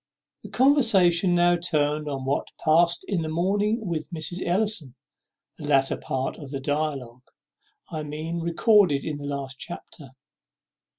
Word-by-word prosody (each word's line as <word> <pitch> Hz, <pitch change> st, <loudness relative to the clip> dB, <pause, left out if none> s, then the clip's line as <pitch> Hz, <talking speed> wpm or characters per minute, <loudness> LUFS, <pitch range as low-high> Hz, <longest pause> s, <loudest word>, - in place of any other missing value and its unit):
The -, -, -10 dB
conversation 195 Hz, -, +4 dB
now 175 Hz, 0 st, +4 dB
turned 150 Hz, -3 st, -1 dB
on 135 Hz, -2 st, -4 dB
what 135 Hz, +2 st, -1 dB, 0.2 s
past 170 Hz, +2 st, +3 dB
in 190 Hz, -4 st, -1 dB
the 160 Hz, -, -3 dB
morning 205 Hz, +7 st, 0 dB
with 165 Hz, -4 st, -3 dB
Mrs. 175 Hz, +1 st, -5 dB
Ellison, 175 Hz, -, 0 dB, 0.6 s
the 150 Hz, -, -6 dB
latter 135 Hz, -2 st, +3 dB
part 130 Hz, 0 st, -3 dB
of 145 Hz, -3 st, -9 dB
the 135 Hz, 0 st, -4 dB
dialogue, 135 Hz, -4 st, -3 dB, 0.6 s
I 155 Hz, -, -3 dB
mean, 155 Hz, +3 st, -5 dB
recorded 170 Hz, -, +3 dB
in 155 Hz, -2 st, -3 dB
the 145 Hz, -, -6 dB
last 135 Hz, -2 st, -5 dB
chapter. 140 Hz, -3 st, -9 dB
160 Hz, 140 wpm, -25 LUFS, 145-175 Hz, 0.6 s, conversation